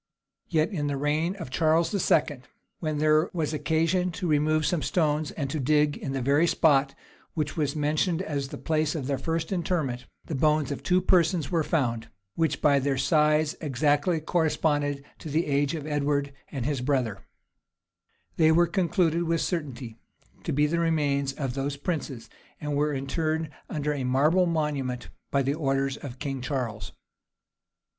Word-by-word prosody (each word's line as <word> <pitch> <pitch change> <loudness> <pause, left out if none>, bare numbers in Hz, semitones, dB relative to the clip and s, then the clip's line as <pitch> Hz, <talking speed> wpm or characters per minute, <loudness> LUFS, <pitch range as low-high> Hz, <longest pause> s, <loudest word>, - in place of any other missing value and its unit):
Yet 160 +2 +1
in 150 -7 -2
the 140 -1 -1
reign 155 +6 0
of 165 -10 -8
Charles 160 +3 +2
II., 150 -8 +1 0.4
when 155 -2 -2
there 155 +1 +3
was 160 -3 -1
occasion 165 +4 +1
to 180 +2 -4
remove 155 0 +2
some 170 -1 +1
stones 150 +2 0
and 140 -4 -4
to 155 - -2
dig 150 +2 +2
in 135 - -5
the 135 -2 -2
very 145 +6 +3
spot 140 -4 +3 0.4
which 155 -2 -2
was 145 -3 -1
mentioned 155 +4 0
as 140 -5 -3
the - - -8
place 155 -1 0
of 145 -5 -3
their 135 -1 -1
first 165 +4 -2
interment, 160 -9 -1 0.2
the - - -5
bones 150 0 +2
of 140 - -4
two 180 0 +2
persons 175 -4 +2
were 170 - +2
there - - -5
found, 120 -8 0 0.2
which 160 +2 -1
by 140 -2 +5
their 135 0 0
size 150 +2 +2
exactly 150 +3 +1
corresponded 150 -3 0
to 155 - -7
the 160 +4 +1
age 145 +2 +1
of 150 -3 -5
Edward 145 -1 0 0.2
and 130 -4 -3
his 140 -3 -1
brother: 125 -7 0 1.2
they 160 -1 +5
were 170 +2 +5
concluded 170 -1 +1
with 165 0 +1
certainty 130 -9 -4 0.5
to - - -2
be 150 +2 +3
the 170 +3 0
remains 145 -4 +1
of 135 -3 -3
those 140 +1 -3
princes, 140 -6 -4 0.3
and 150 -1 -3
were 150 +1 +1
interred 155 +3 -2 0.2
under 150 -1 -1
a 140 -3 -3
marble 150 +8 +3
monument 140 - -2 0.2
by 140 0 +1
orders 135 -2 0
of 130 -3 -8
King 135 -2 -4
Charles. 125 -6 -3
150 Hz, 165 wpm, -27 LUFS, 140-160 Hz, 1.2 s, by